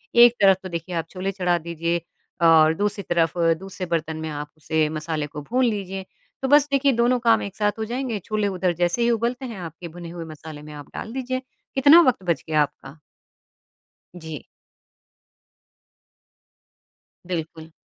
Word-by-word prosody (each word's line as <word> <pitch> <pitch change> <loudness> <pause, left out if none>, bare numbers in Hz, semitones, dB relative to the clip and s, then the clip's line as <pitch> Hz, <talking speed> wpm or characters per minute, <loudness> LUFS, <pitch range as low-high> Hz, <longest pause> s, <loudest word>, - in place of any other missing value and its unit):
एक 240 0 +8
तरफ 195 -2 +6
तो 185 - -6
देखिए 170 +1 -5
आप 165 -1 -2
छोले 190 +1 -3
चढ़ा 180 -2 +1
दीजिए 170 +1 -2 0.5
और 160 -1 +6
दूसरी 205 +1 -1
तरफ 170 0 +1 0.2
दूसरे 190 0 -6
बर्तन 160 -1 -2
में 160 0 -4
आप 150 0 -5
उसे 155 0 0
मसाले 155 -1 -3
को 150 0 -8
भून 250 - +1
लीजिए। 195 -4 -2 0.4
तो 265 - 0
बस 290 0 +6
देखिए 275 0 +3
दोनों 240 +2 +2
काम 230 -2 +4
एक 200 - -6
साथ 210 -1 +1
हो 220 - -1
जाएँगे, 240 -1 -3
छोले 210 +2 -1
उधर 185 -2 0
जैसे 175 +6 0
ही 235 - +3
उबलते 235 +3 -1
हैं 230 -5 -6
आपके 170 0 -8
भुने 170 +1 -9
हुए 170 -1 -7
मसाले 155 -1 -10
में 150 0 -10
आप 145 -1 -10
डाल 225 - -6
दीजिए, 255 0 -2 0.3
कितना 285 +5 +8
वक़्त 255 - +2
बच 165 -5 +1
गया 155 -1 +3
आपका। 140 +1 -9 1.2
जी। 160 -3 -7 2.8
बिल्कुल। 160 -2 -5
180 Hz, 170 wpm, -23 LUFS, 160-230 Hz, 2.8 s, एक